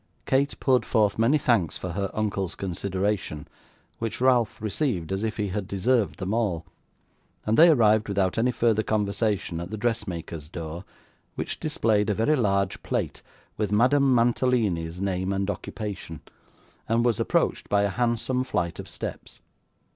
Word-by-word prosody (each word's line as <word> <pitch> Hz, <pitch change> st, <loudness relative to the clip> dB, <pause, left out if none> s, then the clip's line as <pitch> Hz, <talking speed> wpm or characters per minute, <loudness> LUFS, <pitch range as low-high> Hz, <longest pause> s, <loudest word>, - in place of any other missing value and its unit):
Kate 140 Hz, +2 st, +1 dB
poured 130 Hz, -2 st, +3 dB
forth 105 Hz, -3 st, +1 dB
many 120 Hz, +7 st, +4 dB
thanks 115 Hz, -, +1 dB
for 90 Hz, -, -5 dB
her 100 Hz, +2 st, -2 dB
uncle's 100 Hz, -4 st, -1 dB
consideration, 95 Hz, -3 st, -2 dB, 0.5 s
which 115 Hz, -1 st, -3 dB
Ralph 120 Hz, -4 st, +2 dB
received 105 Hz, -, -1 dB
as 95 Hz, +1 st, -1 dB
if 110 Hz, 0 st, -2 dB
he 105 Hz, -2 st, -1 dB
had 95 Hz, 0 st, -3 dB
deserved 105 Hz, +3 st, +1 dB
them 95 Hz, +1 st, -3 dB
all, 100 Hz, -8 st, 0 dB, 0.8 s
and 110 Hz, -, +2 dB
they 170 Hz, +6 st, +8 dB
arrived 110 Hz, -7 st, +4 dB
without 100 Hz, 0 st, 0 dB
any 120 Hz, +2 st, +3 dB
further 115 Hz, -3 st, +2 dB
conversation 105 Hz, -4 st, -1 dB
at 85 Hz, +1 st, -6 dB
the 110 Hz, -, -5 dB
dressmaker's 90 Hz, -9 st, -3 dB
door, 85 Hz, +2 st, -6 dB, 0.5 s
which -, -, -4 dB
displayed 110 Hz, -9 st, +1 dB
a 105 Hz, -, +1 dB
very 115 Hz, +9 st, +2 dB
large 100 Hz, -6 st, 0 dB
plate, -, -, -3 dB, 0.4 s
with 105 Hz, -2 st, -1 dB
Madame 130 Hz, +6 st, +4 dB
Mantalini's 115 Hz, -8 st, +1 dB
name 95 Hz, -1 st, -1 dB
and 100 Hz, +1 st, 0 dB
occupation, 100 Hz, -5 st, -6 dB, 0.7 s
and 115 Hz, +1 st, +2 dB
was 120 Hz, -3 st, +2 dB
approached -, -, 0 dB
by 100 Hz, 0 st, +3 dB
a 100 Hz, -, +2 dB
handsome 120 Hz, +3 st, 0 dB
flight 90 Hz, -10 st, -2 dB
of -, -, -7 dB
steps. -, -, -7 dB
105 Hz, 155 wpm, -26 LUFS, 95-120 Hz, 0.8 s, they